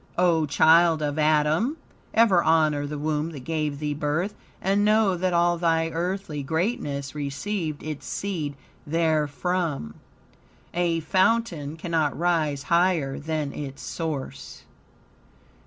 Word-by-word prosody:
O 170 -3 +3
child 160 +2 +5
of 145 +1 -1
Adam! 155 - +2 0.3
Ever 220 -6 +5
honor 155 -3 +2
the 150 +1 -5
womb 150 +1 -1
that 140 - -7
gave 150 0 -2
thee 150 0 -2
birth, 150 +7 -1 0.3
and 195 +2 +1
know 210 -2 +3
that 185 +1 0
all 175 0 +2
thy 165 -1 +2
earthly 170 -2 -3
greatness 145 - -2
received 150 +3 -3
its 155 -2 -6
seed 165 -8 -3 0.3
therefrom. 160 - 0 0.8
A 170 -1 +1
fountain 185 -5 +1
cannot 160 -3 -1
rise 160 -5 0
higher 170 -5 +1
than 150 -2 -3
its 140 -2 -7
source. 145 -4 -5
160 Hz, 120 wpm, -25 LUFS, 150-175 Hz, 0.8 s, child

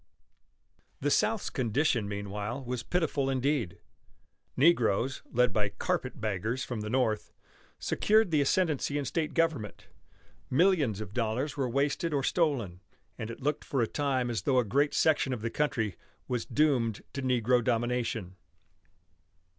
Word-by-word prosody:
The 145 +1 0
South's 215 +3 +1
condition 125 -3 +1
meanwhile 105 +5 -4
was 125 -1 -3
pitiful 145 -2 0
indeed. 130 - 0 0.8
Negroes, 130 -4 +3
led 125 -2 +3
by 105 -1 +1
"carpet 100 - -2
baggers" 110 +4 -2
from 120 -5 -4
the 105 - -4
North, 110 -3 0 0.5
secured 215 -3 +2
the 150 -2 +3
ascendancy 145 -2 +1
in 145 - -2
state 155 +3 -2
government. 160 - -1 0.6
Millions 140 - +3
of 100 -2 -7
dollars 125 +5 -1
were 135 -3 -1
wasted 145 +5 0
or 140 - 0
stolen, 130 - 0 0.4
and 110 -1 -4
it 115 - -8
looked 150 +1 0
for 135 - -2
a 115 - +3
time 130 -3 0
as 115 - -2
though 135 -3 +1
a 125 - +3
great 140 +8 +1
section 145 -4 +3
of 115 -3 -5
the 115 - -2
country 115 -8 -1 0.3
was 125 -2 -2
doomed 130 -8 +1
to 140 - -3
negro 125 -1 +2
domination. 115 -5 -1
125 Hz, 145 wpm, -30 LUFS, 110-145 Hz, 0.8 s, Negroes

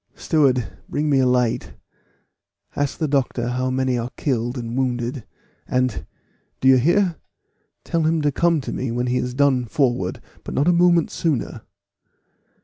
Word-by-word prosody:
"Steward, 135 -7 +1
bring 150 0 -1
me 135 - +4
a 130 - +3
light. 125 -2 0 1.0
Ask 145 -1 -1
the 160 - -1
doctor 130 -4 0
how 130 +1 -1
many 130 -1 0
are 120 +1 -3
killed 120 -2 -1
and 115 -1 -5
wounded; 125 -1 -2 0.4
and 125 -11 -1 0.5
do 130 - +1
you 130 0 +7
hear? 170 +6 +2 0.7
tell 165 - -1
him 160 0 +1
to 145 - +2
come 170 +1 +2
to - - -5
me 130 - -3
when 120 +1 -1
he 125 0 0
is 125 0 -3
done 135 -3 +2
forward, 120 -7 0 0.2
but - - -6
not 140 +4 +2
a 175 - +5
moment 170 -1 +3
sooner. 155 -8 -2
130 Hz, 160 wpm, -22 LUFS, 125-150 Hz, 1.0 s, you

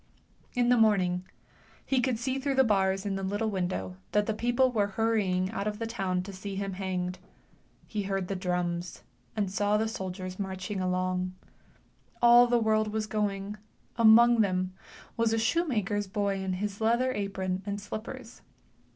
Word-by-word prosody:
In 245 -1 +2
the 245 - +5
morning 185 -4 +2 0.6
he 265 -2 +2
could 250 -2 0
see 260 +3 -2
through 275 0 -1
the 265 - +6
bars 195 -3 +1
in 195 -1 -1
the - - -4
little 205 +3 -1
window 175 - -3 0.2
that 210 0 +3
the 220 - -1
people 245 +3 +2
were 210 -4 +1
hurrying 200 -3 0
out 210 -2 -3
of 210 0 -2
the 230 - -3
town 190 -5 -1
to 200 +1 -8
see 195 +1 -6
him 195 -1 -3
zed. 185 -1 -2 0.7
He 210 -2 -3
he^rd 195 -1 -1
the 195 - -3
drums, 180 -1 -2 0.3
and 210 -2 0
the 205 +3 +1
soldiers 185 -3 -5
marching 190 0 -4
along. 185 0 -1 0.8
All 240 0 +7
the 240 0 +3
world 215 -1 +2
was 215 0 -1
going; 205 -1 -2 0.4
among 230 +1 +7
them 185 -2 0 0.4
was 230 -1 +2
a - - +2
shoe 330 +11 +1
maker's 205 -5 -1
bov 200 0 -1
in 190 -1 -1
his 200 +2 -4
leather 235 +4 +2
apron 190 -3 -2
and 200 0 -2
slippers. 225 +4 -8
205 Hz, 170 wpm, -29 LUFS, 185-225 Hz, 0.8 s, All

